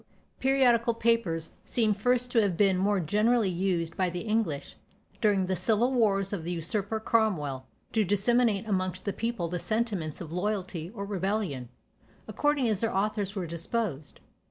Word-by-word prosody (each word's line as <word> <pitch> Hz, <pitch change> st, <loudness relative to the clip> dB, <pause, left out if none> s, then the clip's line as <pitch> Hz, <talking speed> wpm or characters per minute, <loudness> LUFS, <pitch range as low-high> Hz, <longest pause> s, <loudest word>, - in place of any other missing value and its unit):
" -, -, -40 dB
Periodical 245 Hz, -4 st, +3 dB
papers 220 Hz, -9 st, 0 dB
seem 220 Hz, -3 st, +1 dB
first 245 Hz, +4 st, +1 dB
to 230 Hz, -, +4 dB
have 195 Hz, -5 st, 0 dB
been 195 Hz, -1 st, +4 dB
more 200 Hz, +2 st, +2 dB
generally 210 Hz, +5 st, +2 dB
used 175 Hz, -2 st, -1 dB
by 185 Hz, -1 st, +1 dB
the 175 Hz, 0 st, -4 dB
English, 215 Hz, -11 st, -1 dB, 0.5 s
during 205 Hz, -3 st, +3 dB
the 185 Hz, +1 st, -1 dB
civil 220 Hz, +8 st, +1 dB
wars 200 Hz, -5 st, +2 dB
of 185 Hz, -5 st, -3 dB
the 170 Hz, -, -3 dB
usurper 200 Hz, +6 st, -2 dB
Cromwell, 160 Hz, -, 0 dB, 0.3 s
to 220 Hz, -, +3 dB
disseminate 210 Hz, +2 st, +2 dB
amongst 185 Hz, -2 st, -1 dB
the 200 Hz, -, -1 dB
people 230 Hz, -6 st, -2 dB
the 175 Hz, +1 st, -3 dB
sentiments 205 Hz, -8 st, -2 dB
of 165 Hz, -2 st, -7 dB
loyalty 185 Hz, -3 st, -2 dB
or 200 Hz, -2 st, -4 dB
rebellion, 190 Hz, -, -2 dB, 0.6 s
according 290 Hz, -4 st, +1 dB
as 215 Hz, -3 st, 0 dB
their 225 Hz, -, +1 dB
authors 205 Hz, 0 st, -1 dB
were 190 Hz, -3 st, -2 dB
disposed. 170 Hz, -, -3 dB
200 Hz, 160 wpm, -28 LUFS, 180-225 Hz, 0.6 s, to